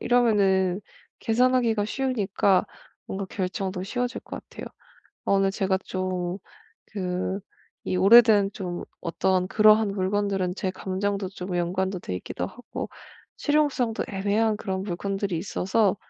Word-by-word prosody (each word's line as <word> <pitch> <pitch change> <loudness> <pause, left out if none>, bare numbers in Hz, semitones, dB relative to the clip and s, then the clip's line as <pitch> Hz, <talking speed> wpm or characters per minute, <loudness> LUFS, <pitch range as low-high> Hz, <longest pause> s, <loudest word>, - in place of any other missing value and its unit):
이러면은 200 -6 +3 0.4
계산하기가 235 -2 +2
쉬우니까 205 -7 +1 0.4
뭔가 195 0 -4
결정도 185 0 -3
쉬워질 245 +4 -2
것 - - -7
같아요. - - -10 0.6
어 - - +2
오늘 195 0 +3
제가 190 -1 0
좀 185 -1 -2 0.5
그 185 0 -3 0.5
이 185 - 0
오래된 205 0 +7
좀 180 -3 -4 0.2
어떤 185 +1 +1
그러한 215 +1 +5
물건들은 195 -1 0
제 190 - -1
감정도 190 +1 -2
좀 185 -1 -6
연관도 185 +2 -1
돼 90 - -5
있기도 90 0 -4
하고 245 - -7 0.5
실용성도 290 -6 +1
애매한 205 +2 +1
그런 190 -3 -3
물건들이 195 0 -2
있어서 195 +3 +1
195 Hz, 285 characters per minute, -26 LUFS, 185-215 Hz, 0.6 s, 오래된